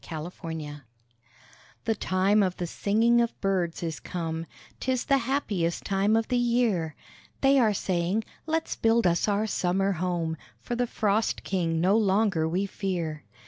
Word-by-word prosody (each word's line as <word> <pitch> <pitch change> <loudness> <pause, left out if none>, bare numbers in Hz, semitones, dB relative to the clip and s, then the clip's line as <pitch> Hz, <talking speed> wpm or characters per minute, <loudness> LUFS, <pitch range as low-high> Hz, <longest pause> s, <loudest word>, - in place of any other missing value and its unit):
BUILDING 160 +1 -5 0.3
TIME 145 0 -8 1.0
The 225 - +2
time 200 0 +2
of 185 -2 0
the 175 - -2
singing 225 +7 +2
of 235 - -2
birds 180 -4 -1
is 160 -2 -3
come; 165 -2 -4 0.3
'Tis 255 -1 -1
the 275 -1 +3
happiest 215 -10 -1
time 200 +2 +2
of 225 0 0
the 250 -1 +2
year: 230 -10 +1 0.5
They 275 0 +5
are 220 -4 +3
saying, 185 +4 0 0.2
"Let's 320 0 -1
build 230 -1 +2
us 170 +2 +2
our 205 +1 +1
summer 195 -1 +1
home, 170 -2 -1 0.2
For 240 - -4
the 245 0 0
frost 215 0 0
king 165 -4 0
no 185 +5 +3
longer 195 -6 +2
we 185 +4 0
fear." 175 -6 -3
195 Hz, 155 wpm, -27 LUFS, 170-225 Hz, 1.0 s, They